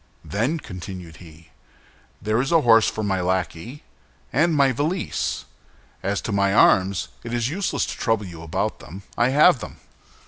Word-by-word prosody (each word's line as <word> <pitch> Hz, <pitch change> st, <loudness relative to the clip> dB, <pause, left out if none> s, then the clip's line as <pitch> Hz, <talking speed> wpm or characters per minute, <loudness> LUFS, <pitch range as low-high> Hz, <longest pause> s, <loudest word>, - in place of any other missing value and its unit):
"Then," 120 Hz, +11 st, -1 dB
continued 90 Hz, -, -9 dB
he, 80 Hz, -1 st, -15 dB, 0.7 s
"there 110 Hz, +3 st, 0 dB
is 135 Hz, -, -2 dB
a 165 Hz, -1 st, +5 dB
horse 115 Hz, -4 st, +5 dB
for 110 Hz, -, -4 dB
my 95 Hz, -2 st, 0 dB
lackey, 95 Hz, -, -3 dB, 0.5 s
and 160 Hz, +4 st, +2 dB
my 140 Hz, -2 st, +4 dB
valise. 155 Hz, +9 st, -2 dB, 0.6 s
As 100 Hz, +1 st, -1 dB
to -, -, -4 dB
my 100 Hz, 0 st, +2 dB
arms, 95 Hz, -3 st, +3 dB
it 115 Hz, +1 st, -4 dB
is 120 Hz, +1 st, 0 dB
useless 185 Hz, +6 st, -1 dB
to -, -, -5 dB
trouble 115 Hz, -3 st, 0 dB
you 85 Hz, -3 st, -9 dB
about 85 Hz, -1 st, -2 dB
them; 90 Hz, +9 st, -11 dB
I 120 Hz, -, +2 dB
have 150 Hz, +2 st, +5 dB
them." -, -, -8 dB
110 Hz, 165 wpm, -23 LUFS, 95-135 Hz, 0.7 s, a